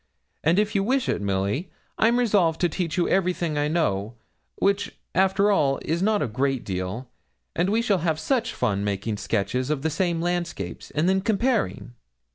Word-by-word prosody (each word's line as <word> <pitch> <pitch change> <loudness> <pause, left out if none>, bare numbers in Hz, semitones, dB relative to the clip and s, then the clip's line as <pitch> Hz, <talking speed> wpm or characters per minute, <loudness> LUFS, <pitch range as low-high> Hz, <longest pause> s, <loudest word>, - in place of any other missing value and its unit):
And 165 +4 +3
if 210 0 +2
you 195 -2 +2
wish 260 +5 +1
it, - - 0
Milly, 100 - -1 0.3
I'm 235 +2 +4
resolved 200 -9 +2
to 175 - +3
teach 165 0 -3
you 175 - +2
everything 180 -4 +1
I 145 0 +1
know, 115 - 0 0.4
which, 200 +1 0 0.2
after 195 +2 +3
all, 140 -8 +2
is 165 +3 0
not 210 +1 +2
a - - -1
great 130 +3 -1
deal, 95 +6 -4 0.5
and 175 +3 +1
we 225 +3 +2
shall 205 -5 +2
have 160 -1 0
such 245 +4 0
fun 100 -1 -1
making 105 +1 -2
sketches 115 +5 -1
of 150 -2 -1
the 160 - 0
same 170 +1 0
landscapes, 170 - -3
and 155 +4 0
then 190 +1 +3
comparing.' 220 - 0
165 Hz, 180 wpm, -25 LUFS, 125-195 Hz, 0.5 s, I'm